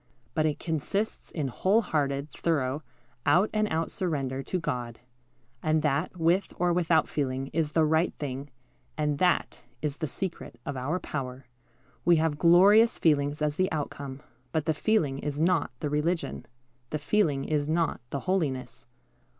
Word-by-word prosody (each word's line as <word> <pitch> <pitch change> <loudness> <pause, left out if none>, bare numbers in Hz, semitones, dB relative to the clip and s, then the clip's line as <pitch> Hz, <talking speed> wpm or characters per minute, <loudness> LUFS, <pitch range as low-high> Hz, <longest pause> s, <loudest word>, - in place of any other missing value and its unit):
But 155 0 +2
it 150 - -1
consists 175 +6 -2
in 145 -5 -2
whole 195 - +2
hearted, 140 -2 -1
thorough, 145 -3 0 0.4
out 180 +8 +4
and 215 0 +2
out 160 +1 -1
surrender 135 -7 -2
to 180 +6 -2
God; 120 -7 -3 0.6
and 155 -1 +1
that, 150 +5 0
with 170 +4 +2
or 175 0 +2
without 170 -2 +3
feeling, 135 -2 -2
is 155 -1 0
the 160 -1 +4
right 160 +3 +2
thing, 140 0 -5 0.5
and 150 -2 0
that 180 -1 +1 0.2
is 150 0 -3
the 155 - -2
secret 175 +2 -5
of 140 - -3
our 135 +7 -1
power. 130 -5 -5 0.6
We 175 0 +5
have 155 -2 +1
glorious 200 +7 +6
feelings 145 -1 +2
as 150 0 0
the 185 0 +1
outcome; 140 -2 -4 0.3
but 160 -2 0
the 160 - +2
feeling 150 -6 +1
is 145 0 -3
not 170 -1 +2
the 150 - -1
religion 150 -5 -1 0.4
the 155 - -1
feeling 145 -3 +1
is 150 -1 0
not 165 -3 +1
the 140 - -3
holiness. 155 -13 -2
155 Hz, 160 wpm, -28 LUFS, 140-170 Hz, 0.6 s, glorious